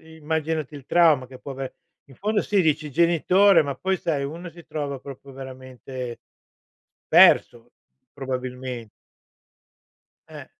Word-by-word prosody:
immaginati 160 -1 -3
il 140 -2 -11
trauma 160 -7 +4
che 130 0 -13
può 140 - -9
aver 135 0 -6 0.3
in 135 - -15
fondo 210 - 0
sì, 200 -2 +1
dici 155 -2 0
genitore, 170 +4 +4
ma 140 -2 -4
poi 190 0 -1
sai 145 -4 -1
uno 170 +5 -6
si 170 0 -14
trova 145 -3 -4
proprio 140 +1 -11
veramente 130 -2 -8 0.9
perso, 120 0 +5 0.4
probabilmen 130 -3 -5 1.4
Eh. - - -10
140 Hz, 125 wpm, -24 LUFS, 130-165 Hz, 1.4 s, perso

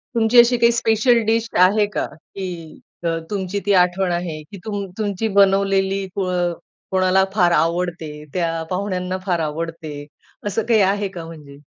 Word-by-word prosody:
तुमची 230 +1 +5
अशी 240 +1 +6
काही 235 0 +4
स्पेशल 230 +1 +3
डिश 225 +1 +1 0.2
आहे 205 +2 +3
का, - - -1
की 185 +5 -9 0.6
त - - 0 0.2
तुमची 200 -1 -2
ती 205 - +3
आठवण 180 0 +3
आहे? 170 -3 -3
की 195 +7 -12
तुम 205 -2 -3
तुमची 210 0 -1
बनवलेली 195 0 +3
कोअ 185 -2 -1 0.6
कोणाला 190 0 +3
फार 175 -4 +3
आवडते, 165 -1 0 0.2
त्या 170 -2 0 0.2
पाहुण्यांना 185 -1 -2
फार 175 -3 0
आवडते, 155 -1 -5 0.4
असं 210 +2 -1
काही 220 -3 +5
आहे 205 0 -2
का 170 -3 -8
म्हणजे? 150 -4 -12
190 Hz, 155 wpm, -20 LUFS, 170-205 Hz, 0.6 s, अशी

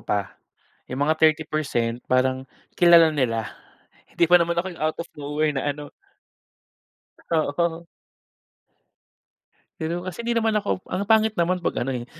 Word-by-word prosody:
pa, 100 -4 -3 0.5
yung 130 +3 -1
mga 155 +1 +1
30% 155 -7 +1
parang 130 +1 +1 0.3
kilala 170 -2 +7
nila 115 -6 -1 0.6
hindi - - +3
pa 180 - +8
naman 170 0 0
ako 170 +2 0
yung 170 - -14
out 155 0 0
of 170 - -16
nowhere 150 +1 -1
na 135 -2 -3
ano 150 0 -9 1.5
Oo. 165 +2 0 1.9
Pero 170 +3 -4
kasi 185 +5 -5
hindi 235 0 0
naman 225 -1 +1
ako 205 -3 -2
ang 185 +2 -3
pangit 220 +1 +3
naman 175 0 +1
pag 175 - -2
ano, 135 - -2
eh, 125 -2 -4
160 Hz, 145 wpm, -23 LUFS, 135-175 Hz, 1.9 s, pa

